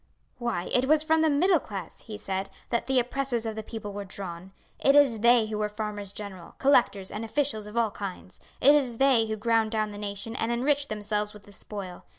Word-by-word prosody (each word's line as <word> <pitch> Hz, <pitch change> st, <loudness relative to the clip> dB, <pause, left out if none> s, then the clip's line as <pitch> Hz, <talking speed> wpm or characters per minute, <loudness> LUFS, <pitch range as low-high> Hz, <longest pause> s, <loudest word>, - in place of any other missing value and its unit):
"Why, 235 Hz, -7 st, -2 dB
it 250 Hz, +1 st, +4 dB
was 305 Hz, +1 st, +4 dB
from 320 Hz, 0 st, +3 dB
the 320 Hz, -, +4 dB
middle 340 Hz, +4 st, +4 dB
class," 195 Hz, -9 st, -8 dB
he 215 Hz, -2 st, -8 dB
said, 195 Hz, -1 st, -3 dB, 0.2 s
"that 235 Hz, -, 0 dB
the 265 Hz, -1 st, +2 dB
oppressors 250 Hz, -1 st, -1 dB
of 220 Hz, -1 st, -3 dB
the 220 Hz, -, -4 dB
people 215 Hz, -2 st, -7 dB
were 205 Hz, 0 st, -4 dB
drawn. 185 Hz, -1 st, -8 dB, 0.3 s
It 275 Hz, -, +4 dB
is 270 Hz, -6 st, +5 dB
they 235 Hz, 0 st, +5 dB
who 215 Hz, -1 st, -4 dB
were 210 Hz, 0 st, 0 dB
farmers 210 Hz, -2 st, -5 dB
general, 200 Hz, -4 st, -8 dB
collectors, 240 Hz, -8 st, +3 dB
and 210 Hz, -, -4 dB
officials 225 Hz, -3 st, -1 dB
of 210 Hz, +2 st, -8 dB
all 230 Hz, -2 st, +2 dB
kinds. 190 Hz, -2 st, -7 dB, 0.2 s
It 280 Hz, +3 st, +8 dB
is 260 Hz, -6 st, +2 dB
they 260 Hz, -4 st, +4 dB
who 220 Hz, -, -2 dB
ground 225 Hz, 0 st, +2 dB
down 215 Hz, -1 st, -1 dB
the 205 Hz, -, -8 dB
nation 205 Hz, +2 st, -5 dB
and 225 Hz, -, -1 dB
enriched 280 Hz, +4 st, +1 dB
themselves 210 Hz, 0 st, -2 dB
with 210 Hz, -, -13 dB
the 205 Hz, -, -16 dB
spoil. 195 Hz, -2 st, -8 dB
220 Hz, 215 wpm, -27 LUFS, 205-250 Hz, 0.3 s, It